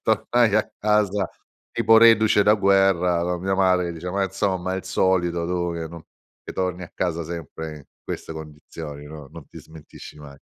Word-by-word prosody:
tornai 110 0 +2
a 110 - +1
casa 105 -3 +1 0.4
tipo 115 -1 +4
reduce 110 -2 +6
da 105 +1 +5
guerra 95 -3 +3
con 90 0 -2
mia 95 +1 0
madre 95 -2 +3
che 85 - -4
diceva: 90 +3 -6
"Ma 100 0 +1
insomma, 95 -1 -2
il 95 - -4
solito 85 -2 +1
tu 85 -1 -1
che 80 -1 -4
non 85 0 -10 0.4
che - - -7
torni 90 -1 -2
a 85 - -9
casa 85 -2 -2
sempre 80 -1 -7
in 70 - -14 0.2
queste - - -6
condizioni, 75 -1 -9
no 75 -2 -10
non - - -12
ti - - -12
smentisci 80 -1 -13
mai." 70 -2 -12
90 Hz, 185 wpm, -23 LUFS, 80-100 Hz, 0.4 s, reduce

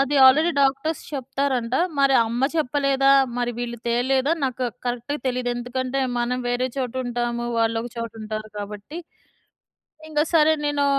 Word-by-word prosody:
అది 275 +1 +1
already 310 +6 +5
doctors 275 +3 +1
చెప్తారంట. 265 -2 -1 0.2
మరి 275 -1 +4
అమ్మ 240 +4 0
చెప్పలేదా? 275 -1 +2 0.3
మరి 245 0 0
వీళ్ళు 240 -1 -4
తేలేదా? 260 +4 +2
నాకు 255 -1 -2 0.2
కరెక్ట్‌గా 245 +4 -2
తెలీదు. 250 -1 -1
ఎందుకంటే 255 +2 -2 0.2
మనం 245 +1 0
వేరే 245 +1 0
చోట 255 -3 -2
ఉంటాము. 240 0 -2
వాళ్ళు 225 0 +1
ఒక 240 - -6
చోట 230 -1 -4
ఉంటారు 215 0 -5
కాబట్టి. 205 +10 -7 1.1
ఇంగ 300 -1 0
సరే 315 0 +6
నేనూ 290 -1 +1
255 Hz, 140 wpm, -23 LUFS, 240-275 Hz, 1.1 s, సరే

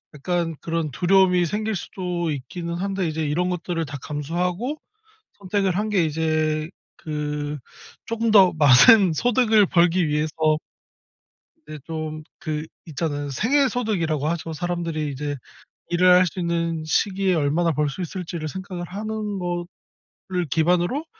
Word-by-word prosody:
약간 165 +2 -2
그런 165 -2 -2
두려움이 180 +3 +3
생길 215 +5 -2
수도 175 -3 -3
있기는 170 +5 -5
한데 190 +1 -2
이제 160 0 -2
이런 165 +5 0
것들을 170 -1 -2
다 145 -1 -6
감수하고 175 - -2 0.6
선택을 195 -1 0
한 210 +2 -1
게 195 -5 +2
이제 155 0 0 0.3
그 150 -1 -4 0.5
조금 230 0 -1
더 195 -4 +7
많은 155 - +7
소득을 220 - +3
벌기 175 0 +3
위해서 150 +1 -1 1.4
네 155 - -7
좀 155 -1 -5 0.2
그 155 -1 -3 0.2
있잖아요. 145 -2 -3
생애 265 - +2
소득이라고 175 - -1
하죠. 165 -1 -3
사람들이 165 -2 -3
이제 145 +1 -4 0.6
일을 180 +1 +5
할 180 +1 +5
수 180 +2 -5
있는 170 -1 -1
시기에 190 +4 +1
얼마나 160 +2 +1
벌 150 0 0
수 145 +7 -5
있을지를 170 -2 -5
생각을 185 +1 -6
하는 210 +1 -4
거를 175 -1 -5 0.6
기반으로 175 - +1
170 Hz, 285 characters per minute, -23 LUFS, 155-190 Hz, 1.4 s, 더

